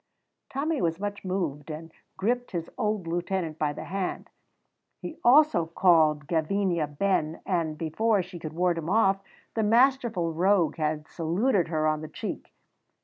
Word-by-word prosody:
Tommy 295 +2 -1
was 165 0 0
much 205 0 -4
moved, 170 -6 -3
and 160 +1 -7 0.3
gripped 245 +5 0
his 170 -2 -4
old 210 -3 -1
lieutenant 170 -1 -2
by 150 -1 +1
the - - -7
hand. 190 0 -4 0.7
He 315 - -8
also 250 - +5
called 160 -4 +3
Gavinia 170 +1 0
ben, 155 +1 0
and, 165 -4 -1
before 195 +6 +1
she 180 -1 -10
could 155 -1 -6
ward 175 0 +1
him 165 +1 -5
off, 195 -2 +3 0.3
the 225 - 0
masterful 230 -6 +2
rogue 175 -2 +2
had 155 -1 -2
saluted 180 +4 0
her 155 -2 0
on 155 0 +1
the 155 - -6
cheek. - - -6
175 Hz, 150 wpm, -27 LUFS, 160-205 Hz, 0.7 s, also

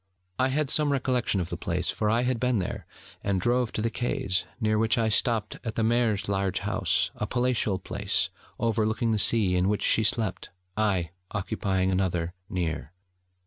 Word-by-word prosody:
I 130 - +4
had 140 +1 0
some 150 -2 +4
recollection 125 -6 +1
of 90 0 -3
the 85 - -3
place, 90 +1 -1
for 105 - -1
I 115 +3 +2
had 125 -2 0
been 125 -1 +2
there, 90 - -4 0.4
and 100 -2 +1
drove 120 +4 +1
to 110 - -2
the 115 - 0
quays, 95 -6 -1
near 110 -2 +1
which 115 +1 +2
I 115 -1 +2
stopped 110 -1 +1
at 115 -3 -4
the 115 - +1
Maire's 115 -3 +1
large 95 -2 0
house, - - 0
a 105 - -4
palatial 120 -5 +1
place 95 - -1 0.3
overlooking 110 0 +1
the 110 - +1
sea, 100 -4 +3
in 90 +2 +2
which 105 - 0
she - - +4
slept, 110 +1 0 0.3
I 95 -6 +1 0.2
occupying 95 -2 -1
another 90 -2 0 0.2
near. 85 -4 -3
110 Hz, 180 wpm, -27 LUFS, 95-120 Hz, 0.4 s, I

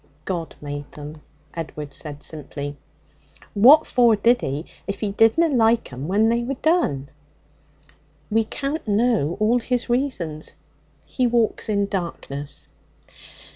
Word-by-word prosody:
'God 170 -4 -4
made 145 0 -6
them,' 150 +1 -9 0.3
Edward 150 -3 -6
said 145 0 -7
simply. 145 -1 -5 0.8
'What 270 +10 +7
for 240 -3 +4
did 235 +4 +3
He, 140 +5 -3 0.2
if 200 0 -3
He 210 -2 -1
didna 225 +11 +4
like 230 - +2
'em 130 +4 -5
when 205 +4 +3
they 235 +1 +2
were 270 +3 -3
done?' 250 - +1 1.2
'We 225 +1 +3
can't 280 +4 -4
know 210 - +1
all 225 +3 +3
His 245 0 -2
reasons; 185 - -2 0.5
He 255 - 0
walks 235 -2 0
in 200 -1 +2
darkness.' 165 -7 -5
205 Hz, 130 wpm, -23 LUFS, 150-240 Hz, 1.2 s, What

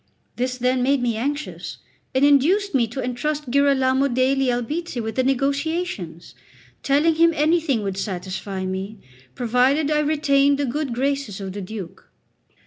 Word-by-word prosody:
This, 250 +1 -2
then, 250 +1 +1
made 275 +2 +2
me 235 -2 0
anxious, 285 +6 -4 0.4
and 265 +2 +4
induced 330 +9 +3
me 245 -4 +2
to 250 +4 -5
entrust 280 +2 -3
Girolamo 275 -1 +3
degli 260 +1 +1
Albizzi 255 +5 -2
with 220 -1 -3
the 260 - +1
negotiations, 275 - -2 0.5
telling 295 +4 +3
him 335 +1 +4
anything 305 -6 +1
would 195 -1 -3
satisfy 190 0 -4
me 190 +3 -4 0.4
provided 255 +5 +2
I 300 - +2
retained 285 -2 +2
the 285 - 0
good 275 +2 -2
graces 275 -5 -2
of 190 -1 -6
the 205 - -5
Duke. 190 -2 -8
265 Hz, 145 wpm, -22 LUFS, 230-290 Hz, 0.5 s, and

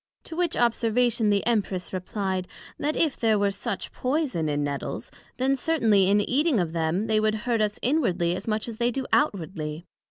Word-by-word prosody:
To 325 - -8
which 350 -1 +1
Observation 235 -1 +2
the 200 -1 +1
Empress 200 -6 -1
replied, 185 0 -2 0.3
That 300 +2 -1
if 315 -5 +2
there 220 -2 +2
were 200 0 +2
such 200 +1 -4
poyson 255 - -1
in 145 0 0
Nettles, 140 -1 -4 0.3
then 265 +2 +2
certainly 225 -10 +3
in 205 +1 +4
eating 280 +3 +2
of 170 -3 -1
them, 165 +5 0
they 215 -1 +2
would 215 0 +1
hurt 235 -3 +1
us 210 0 0
inwardly, 185 - +1
as 190 - -7
much 215 +1 -1
as 230 -2 -6
they 240 +1 +2
do 260 +2 -3
outwardly? 165 - 0
215 Hz, 185 wpm, -26 LUFS, 185-250 Hz, 0.3 s, in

